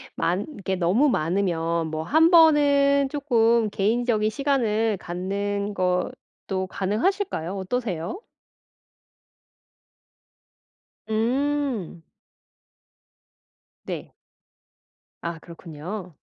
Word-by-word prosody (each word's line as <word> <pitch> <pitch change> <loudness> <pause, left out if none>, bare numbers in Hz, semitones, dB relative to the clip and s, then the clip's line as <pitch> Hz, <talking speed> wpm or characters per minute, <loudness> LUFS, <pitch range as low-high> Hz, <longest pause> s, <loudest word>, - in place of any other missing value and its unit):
많 180 +5 0
이게 190 -1 -2
너무 190 +11 +3
많으면 170 -3 0
뭐 155 0 -3
1 320 - +4
번은 285 -4 +5
쪼끔 235 -6 +2
개인적인 220 +1 +1
시간을 225 -4 0
갖는 200 +4 -3
것도 185 0 -3
가능하실까요? 210 - -1
어떠세요? 190 - -3 2.9
음. 245 - -1 1.8
네. - - -6 1.1
아 170 -1 -4
그렇군요. 170 +2 -8
210 Hz, 150 characters per minute, -24 LUFS, 180-270 Hz, 2.9 s, 번은